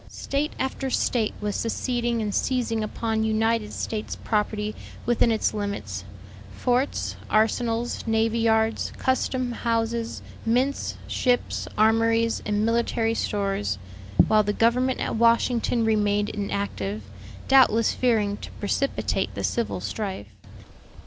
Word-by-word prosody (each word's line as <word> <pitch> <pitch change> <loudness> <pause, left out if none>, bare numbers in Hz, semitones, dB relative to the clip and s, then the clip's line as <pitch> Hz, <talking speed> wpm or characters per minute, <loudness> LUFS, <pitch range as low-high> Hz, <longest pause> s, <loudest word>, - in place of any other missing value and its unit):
State 285 +2 -2
after 265 0 -2
State 235 -3 0
was 210 -1 -2
seceding 235 0 -1
and 205 -1 -2
seizing 235 -4 0
upon 220 +1 -1
United 220 0 +1
States 215 -1 -4
property 210 -1 -1 0.3
within 240 0 +3
its 220 - +1
limits 105 - -4 0.5
forts, 250 +3 0
arsenals, 230 +2 +1
navy 225 +1 +2
yards, 220 0 +2
custom 260 -1 0
houses, 230 0 -1 0.2
mints, 255 +5 0
ships, 245 -1 0
armories, 225 +1 +3
and 210 0 +1
military 230 0 +1
stores 195 - -1 0.5
while 215 -1 +5
the 205 0 -1
government 250 +4 +2
at - - -2
Washington 235 0 +3
remained 210 -1 +2
inactive, 200 - -3 0.4
doubtless 245 -4 +5
fearing 215 -5 +1
to - - -8
precipitate 275 +7 -1
the - - -4
civil 235 -1 -1
strife. 190 - -5
225 Hz, 115 wpm, -25 LUFS, 210-235 Hz, 0.5 s, while